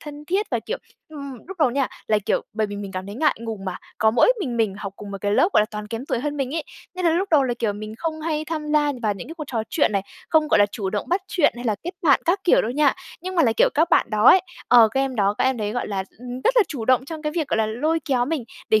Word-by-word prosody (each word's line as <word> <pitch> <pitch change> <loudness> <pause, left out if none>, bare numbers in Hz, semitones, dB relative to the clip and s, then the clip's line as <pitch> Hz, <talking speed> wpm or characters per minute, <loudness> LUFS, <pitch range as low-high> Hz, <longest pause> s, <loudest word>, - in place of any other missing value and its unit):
thân 295 -1 -9
thiết 390 +7 0
và - - +1
kiểu - - -3 0.3
ừm, 280 -4 -8
lúc 385 - -7
đầu 285 -5 +4
nha, 270 +1 0 0.2
là, 215 -1 +3
kiểu, - - +1
bởi 215 0 0
vì 205 0 -6
mình 200 -1 -6
cảm 185 0 -5
thấy 200 - -7
ngại 305 +7 +2
ngùng 220 -4 -6
mà, 185 -2 -3 0.2
có 220 - +4
mỗi 245 - +5
mình 245 -8 -2
mình 215 -4 +1
học 200 -2 -6
cùng 205 -1 -9
một 195 - -5
cái 205 0 0
lớp, 340 - +4
gọi - - +5
là, 210 - +2
toàn 210 -1 -6
kém 230 +5 -6
tuổi - - -1
hơn 295 +3 -3
mình 275 0 -2
ấy. 325 - -2 0.3
Nên 365 0 -4
là 335 - +5
lúc 365 +5 0
đầu 305 -4 +5
là, 250 -2 0
kiểu, 225 -4 0
mình 215 +1 -7
không 320 -1 -3
hay 310 -1 -2
tham 310 -2 -4
gia 295 -1 +3
vào 210 -2 +1
những 195 - -9
cái 325 - -7
cuộc 310 - -6
trò 230 -5 -2
chuyện 290 - +2
này, 200 -1 +1 0.3
không, 310 -1 +3
gọi - - +4
là, 205 - +6
chủ 195 -4 -3
động 210 - -3
bắt 360 +3 +1
chuyện 325 -6 +3
hay 245 - -7
là 220 -3 +1
kết 355 - -2
bạn 290 -5 +5
các 375 +4 +2
kiểu 350 - +5
đâu 225 - -2
nha. 285 +1 +3 0.3
Nhưng 370 +2 -5
mà 335 - +4
là, 235 -6 +3
kiểu, - - +5
các 325 +3 +2
bạn - - +4
đó 215 +1 0
ấy 375 - +8 0.3
ờ, 235 -2 +7
các 265 +5 -1
em 270 -2 -1
đó, 200 -1 +2
các - - +2
em 260 -1 +2
đấy, 210 -1 -2
gọi 245 - -3
là, 195 -2 -2
ừm, 250 +1 -7
rất - - +3
là 465 - +7
chủ 245 -7 -5
động 255 +1 +3
trong 315 +2 -7
cái 300 -1 -2
việc, 320 -4 -1
gọi - - +1
là, 220 - +2
lôi 300 +10 0
kéo 250 -3 +1
mình, 295 -3 -2 0.2
để 220 - +4
260 Hz, 315 wpm, -23 LUFS, 215-315 Hz, 0.3 s, ấy